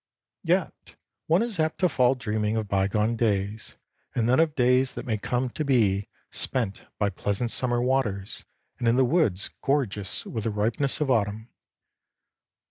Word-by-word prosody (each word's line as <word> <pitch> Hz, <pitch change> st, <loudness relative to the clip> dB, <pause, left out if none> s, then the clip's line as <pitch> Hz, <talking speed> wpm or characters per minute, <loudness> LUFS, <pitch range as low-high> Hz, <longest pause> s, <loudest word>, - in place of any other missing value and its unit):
Yet -, -, -1 dB, 0.3 s
one 170 Hz, +7 st, +4 dB
is 225 Hz, -7 st, -4 dB
apt 155 Hz, 0 st, +1 dB
to 185 Hz, -, +5 dB
fall 130 Hz, -4 st, +3 dB
dreaming 110 Hz, -3 st, -1 dB
of 110 Hz, -2 st, -2 dB
bygone 100 Hz, +3 st, +1 dB
days, 105 Hz, -1 st, -1 dB, 0.4 s
and 115 Hz, -2 st, +1 dB
then 130 Hz, +3 st, +4 dB
of 160 Hz, -2 st, +2 dB
days 125 Hz, +1 st, +3 dB
that -, -, -6 dB
may 110 Hz, -3 st, -1 dB
come 125 Hz, +4 st, -1 dB
to 155 Hz, -, -3 dB
be 105 Hz, -8 st, +2 dB, 0.2 s
spent 115 Hz, -7 st, -2 dB
by 100 Hz, -1 st, +1 dB
pleasant 100 Hz, +5 st, -1 dB
summer 120 Hz, -2 st, +2 dB
waters 115 Hz, -7 st, -1 dB, 0.3 s
and 120 Hz, -, 0 dB
in 115 Hz, -, +4 dB
the 130 Hz, 0 st, +4 dB
woods 120 Hz, -, +2 dB
gorgeous 115 Hz, -9 st, -1 dB
with 110 Hz, -3 st, -4 dB
the -, -, +1 dB
ripeness 115 Hz, +8 st, 0 dB
of 140 Hz, -3 st, +1 dB
autumn. 110 Hz, 0 st, 0 dB
115 Hz, 160 wpm, -26 LUFS, 105-130 Hz, 0.4 s, to